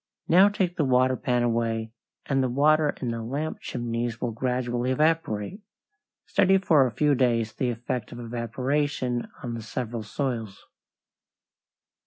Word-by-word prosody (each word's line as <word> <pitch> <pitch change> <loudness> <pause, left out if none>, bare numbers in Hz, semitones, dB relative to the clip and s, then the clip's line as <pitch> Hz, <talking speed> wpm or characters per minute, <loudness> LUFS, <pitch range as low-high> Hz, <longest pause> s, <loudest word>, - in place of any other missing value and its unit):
Now 185 +4 +7
take 190 -3 -1
the 155 - +2
water 130 -1 +3
pan 125 -1 0
away, 115 -1 0 0.3
and 135 -1 +1
the 130 - +1
water 150 +3 +3
in 125 - -2
the 115 0 -4
lamp 140 +7 -3
chimneys 115 -1 -3
will 120 - -2
gradually 125 +1 -1
evaporate. 155 - 0 0.6
Study 195 0 +4
for 155 -8 +4
a - - -4
few 145 +7 +2
days 115 -4 +1
the 125 +3 -1
effect 120 -1 -4
of 120 - -8
evaporation 125 +2 -2 0.2
on 120 - -4
the 115 - -5
several 115 +1 -4
soils. 115 -3 -4
125 Hz, 145 wpm, -26 LUFS, 115-145 Hz, 0.6 s, Now